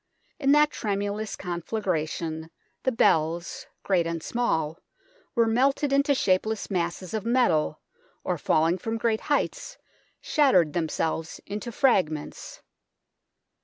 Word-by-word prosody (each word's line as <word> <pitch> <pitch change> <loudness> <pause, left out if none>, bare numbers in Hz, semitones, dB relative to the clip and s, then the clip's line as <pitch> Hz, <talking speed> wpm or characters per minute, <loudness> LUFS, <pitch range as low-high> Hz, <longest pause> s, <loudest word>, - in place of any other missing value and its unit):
In 275 -2 +3
that 300 0 +5
tremendous 205 0 -2
conflagration, 170 -3 -3 0.3
the 260 - +1
bells, 170 -6 +1 0.2
great 180 -4 +2
and 165 -1 -4
small, 165 -10 -1 0.6
were 230 -2 +4
melted 270 +5 +2
into 280 +1 +3
shapeless 210 0 0
masses 175 0 -2
of 215 -2 -2
metal, 225 -11 +2 0.4
or 180 -3 -2
falling 165 +5 +2
from 225 +4 -3
great 225 -1 0
heights - - -1 0.4
shattered 190 - +3
themselves 160 0 -2
into 210 +4 -5
fragments. 185 - 0
200 Hz, 110 wpm, -26 LUFS, 165-240 Hz, 0.6 s, that